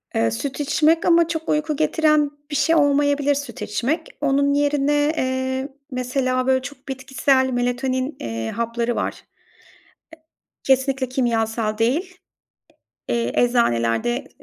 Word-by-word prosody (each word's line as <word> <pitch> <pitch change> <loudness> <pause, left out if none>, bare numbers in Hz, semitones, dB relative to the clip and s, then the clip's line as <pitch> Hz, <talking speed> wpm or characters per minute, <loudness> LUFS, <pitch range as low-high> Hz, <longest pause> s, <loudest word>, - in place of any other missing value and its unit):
Eee, 115 0 +2
süt 270 - -4
içmek 310 +3 +2
ama 335 -1 +5
çok 320 -1 -4
uyku 300 0 0
getiren 300 - +2 0.2
bir - - -2
şey 325 +3 +3
olmayabilir, 285 -1 +3
süt 275 -5 -6
içmek. 265 +10 -2
Onun 280 0 +2
yerine, 290 +1 +2
eee, 260 +1 -1 0.2
mesela, 255 0 -1
böyle 260 0 +3
çok 275 0 -10
bitkisel 265 0 +1
melatonin, 255 +3 -1
eee, 115 -1 -4
hapları 235 +1 -2
var. - - -1
E - - -18 1.4
Kesinlikle, 265 -1 +1
kimyasal 225 -3 -1
değil. 325 - 0 0.9
Eee, 235 0 0
eczanelerde 235 - +1
265 Hz, 120 wpm, -22 LUFS, 240-290 Hz, 1.4 s, ama